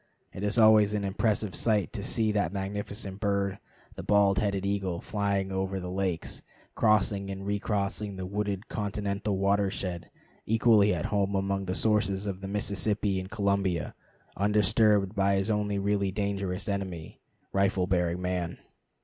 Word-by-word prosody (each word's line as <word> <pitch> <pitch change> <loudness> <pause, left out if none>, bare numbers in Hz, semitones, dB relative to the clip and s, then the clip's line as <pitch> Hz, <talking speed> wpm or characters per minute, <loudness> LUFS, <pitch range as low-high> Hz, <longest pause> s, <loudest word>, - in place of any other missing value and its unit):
It - - -7
is 105 +2 +1
always 110 -2 +6
an 105 - -1
impressive 100 0 0
sight 105 -4 +1
to 105 - -4
see 110 +1 +1
that 100 -6 0
magnificent 100 0 -4
bird, 100 -2 0 0.3
the - - -7
bald 100 -2 +3
headed 100 -2 -1
eagle, 95 -3 -1
flying 100 -2 -1
high - - -3
over 95 0 -1
the 90 0 -5
lakes, 95 -3 -2 0.3
crossing 105 -2 +2
and 95 0 -6
recrossing 100 0 -2
the 95 -1 -5
wooded 100 0 -3
continental 100 -1 -2
watershed, 100 -3 -1 0.4
equally 110 -2 +4
at - - -1
home 100 -1 +1
among 95 0 -1
the 90 0 -2
sources 105 -2 +1
of 100 -2 -4
the 95 - -5
Mississippi 100 0 0
and 95 0 -7
Columbia, 100 - 0 0.4
undisturbed 105 0 +3
by 100 -1 +2
his 95 +3 0
only 105 -1 0
really 100 -1 0
dangerous 100 -2 -2
enemy, 95 -5 -4 0.3
rifle 95 -1 +2
bearing 90 -2 0
man. 90 -1 -2
100 Hz, 150 wpm, -28 LUFS, 95-105 Hz, 0.4 s, always